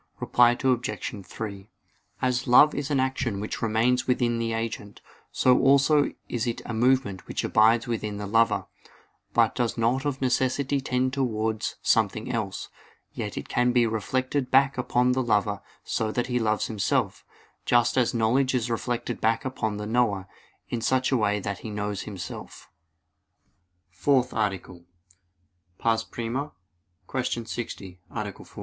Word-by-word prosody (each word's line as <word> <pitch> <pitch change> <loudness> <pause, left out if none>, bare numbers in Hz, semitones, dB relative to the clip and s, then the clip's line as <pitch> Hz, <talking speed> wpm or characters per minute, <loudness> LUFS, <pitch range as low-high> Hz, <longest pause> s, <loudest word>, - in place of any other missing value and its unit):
Reply 120 0 +4
Obj. 125 -4 -1
3: 100 -2 -7 0.5
As 125 +1 0
love 145 +5 +7
is 145 0 -3
an 140 -2 +1
action 130 -5 -1
which 105 - -5
remains 115 +3 +1
within 120 -2 +1
the 115 0 -1
agent, 115 -2 -4 0.3
so 125 -1 +4
also 140 +2 +4 0.2
is 120 -1 -2
it 120 - -2
a 120 - -4
movement 120 -5 +1
which - - -3
abides 110 +2 +4
within 110 -3 -3
the 105 - -4
lover, 115 +3 +2 0.7
but - - +4
does 120 -2 -1
not 120 +4 +1
of 145 -2 -2
necessity 130 +2 +1
tend 130 0 0
towards 110 -5 -1
something - - +1
else; - - -3 0.4
yet - - -5
it - - -5
can 125 0 +2
be 120 -1 +4
reflected 130 +4 -1
back 135 0 +4
upon 125 0 +1
the 130 +1 +1
lover 105 -4 +1 0.2
so 110 -1 -1
that 120 +2 -1
he 125 0 -1
loves 110 -2 +1
himself; 105 -3 -1 0.4
just 120 -1 +3
as 125 -3 +3
knowledge 125 +4 +2
is 120 -1 -1
reflected 120 +1 -3
back 115 +2 +1
upon 110 -5 -2
the 105 - -5
knower, 105 -4 +1 0.4
in 120 - -2
such 130 +3 +1
a 130 - +3
way 105 -2 +1
that 100 0 -4
he 110 - -7
knows 105 -1 -3
himself. 100 -4 -8 1.2
_______________________ - - -31
FOURTH 130 -3 +2
ARTICLE 95 -4 -3 1.0
[I, 115 -1 +3
Q. 115 - -5
60, 100 -6 -6
Art. - - -5
120 Hz, 150 wpm, -26 LUFS, 110-130 Hz, 1.2 s, love